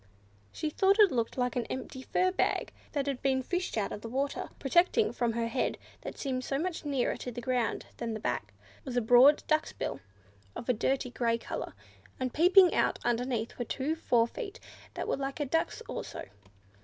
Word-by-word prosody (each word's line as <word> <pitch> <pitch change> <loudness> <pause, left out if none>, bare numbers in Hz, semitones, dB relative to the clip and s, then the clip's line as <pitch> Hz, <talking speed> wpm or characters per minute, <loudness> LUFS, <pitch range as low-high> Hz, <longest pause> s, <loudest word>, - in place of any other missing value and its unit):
She 305 - -3
thought 390 +5 +3
it 415 -5 +7
looked 235 -1 -1
like 250 -1 0
an 245 -2 -1
empty 260 0 -5
fur 370 +7 +1
bag 375 - 0 0.2
that 285 -2 0
had 275 -3 -2
been 265 -1 +1
fished 360 -1 -2
out 205 - 0
of 210 - -5
the 230 - -6
water. 275 +4 -2
Projecting 355 - +3
from 235 -2 0
the 230 0 0
head, 235 +3 -1 0.2
that - - -7
seemed 255 -2 -2 0.2
much 355 +1 -3
nearer 275 -4 0
to 250 - -5
the 245 - -6
ground 245 -1 -1
than 230 -2 -3
the - - -4
back, 120 - -2 0.3
was 250 -2 -4
a - - +6
broad 245 +6 +6
duck's 310 0 +1
bill, - - -4 0.6
of - - -7
a 250 - +4
dirty 255 +2 0
grey 230 -2 +1
colour; - - -6 0.4
and 255 -1 -2
peeping 360 +3 +6
out - - +2
underneath 240 -1 -1
were 245 - -1
two 275 +7 -1
fore 240 -7 +3
feet 400 - -7 0.4
that - - -3
were - - 0
like 275 +2 -4
a 295 - 0
duck's 325 - 0
also. - - -6
260 Hz, 195 wpm, -30 LUFS, 240-310 Hz, 0.6 s, it